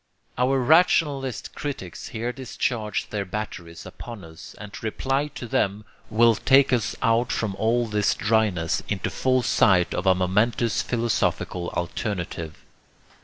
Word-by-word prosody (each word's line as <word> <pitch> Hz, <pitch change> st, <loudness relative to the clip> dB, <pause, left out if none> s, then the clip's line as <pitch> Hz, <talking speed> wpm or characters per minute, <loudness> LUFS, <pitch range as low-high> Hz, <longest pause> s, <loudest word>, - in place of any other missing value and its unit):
Our 130 Hz, +2 st, +2 dB
rationalist 140 Hz, -, +2 dB
critics 130 Hz, -, -6 dB
here 120 Hz, +2 st, -3 dB
discharge 120 Hz, -4 st, -3 dB
their 105 Hz, -2 st, -1 dB
batteries 90 Hz, -4 st, -6 dB
upon 115 Hz, -5 st, -9 dB
us, 80 Hz, -1 st, -12 dB
and 105 Hz, -1 st, -9 dB
to -, -, -9 dB
reply 135 Hz, +6 st, -1 dB
to -, -, -6 dB
them 105 Hz, -1 st, 0 dB, 0.2 s
will 115 Hz, +1 st, +5 dB
take 135 Hz, +4 st, +4 dB
us 120 Hz, -2 st, 0 dB
out 115 Hz, 0 st, +2 dB
from 105 Hz, -3 st, -1 dB
all 120 Hz, +3 st, +2 dB
this 105 Hz, -2 st, +1 dB
dryness 100 Hz, -6 st, +1 dB
into 100 Hz, -3 st, -2 dB
full 130 Hz, -1 st, +1 dB
sight 95 Hz, -6 st, +3 dB
of 90 Hz, +2 st, -2 dB
a 95 Hz, -, +6 dB
momentous 105 Hz, +5 st, +1 dB
philosophical 115 Hz, -6 st, -1 dB
alternative. 85 Hz, -3 st, -3 dB
110 Hz, 135 wpm, -24 LUFS, 95-125 Hz, 0.2 s, a